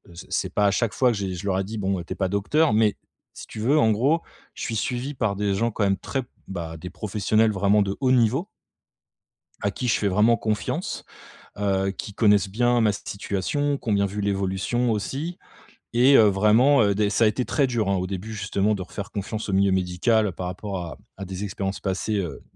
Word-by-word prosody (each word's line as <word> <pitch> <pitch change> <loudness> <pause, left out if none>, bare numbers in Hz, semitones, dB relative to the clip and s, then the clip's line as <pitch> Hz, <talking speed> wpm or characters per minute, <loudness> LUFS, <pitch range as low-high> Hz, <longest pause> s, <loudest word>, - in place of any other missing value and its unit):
c 85 - -10
c'est - - -1
pas 105 - +2
à - - +3
chaque 115 +1 0
fois 125 -2 +3
que 110 - -2
j'ai 95 -2 -3
je 90 - -7
leur 95 -1 +1
ai - - 0
dit: 110 +3 -6
«Bon, 95 -2 -1
heu, - - -5
tu - - -5
es - - -10
pas 95 -2 -1
docteur», 105 - +2
mais, 110 -1 +3 0.4
si - - -10
tu 110 - -9
veux, 135 +8 +2
en 110 -5 +4
gros, 140 +10 +2 0.3
je - - -6
suis 115 - -3
suivi 125 +5 -2
par 110 -5 0
des 100 -1 0
gens 115 +4 +1
quand 105 - -1
même 95 0 +2
très, 135 -2 -3 0.2
bah, 85 -4 -6
des 90 +3 -8
professionnels 105 +3 +1
vraiment 100 +1 +3
de 100 0 -3
haut 130 - +3
niveau 130 - +3 1.2
à 100 - 0
qui 125 - -4
je 110 - +3
fais 105 - 0
vraiment 105 +5 +4
confiance, 110 -2 -3 0.5
heu, 95 -1 0
qui 100 +1 -7
connaissent 105 -2 +3
bien 120 +4 +2
ma 110 - +4
situation, 105 +9 -2
qui 120 - -6
ont 105 - +3
bien 100 0 +2
vu 105 +1 -4
l'évolution 100 +5 0
aussi. 140 - -3 0.6
Et 130 +4 +6
heu, 110 - +7
vraiment, 110 +7 +4
heu, 100 -1 +3
des 105 0 +1
ça 115 - +2
a - - +6
été 110 +4 0
très 140 - +1
dur, 115 -5 -1
hein, 100 - +2
au 90 - -1
début, 100 +4 -5
justement, 105 0 0
de 95 - -5
refaire 100 +2 -7
confiance 105 +2 -4
au - - -1
milieu 95 0 +3
médical 95 +4 +1
par 90 +2 -5
rapport 95 +1 -5
à 80 - -8 0.2
à 100 - -6
des 95 +2 -6
expériences 95 0 -3
passées, 100 +2 -2
heu, 90 -5 -4
105 Hz, 230 wpm, -24 LUFS, 95-115 Hz, 1.2 s, heu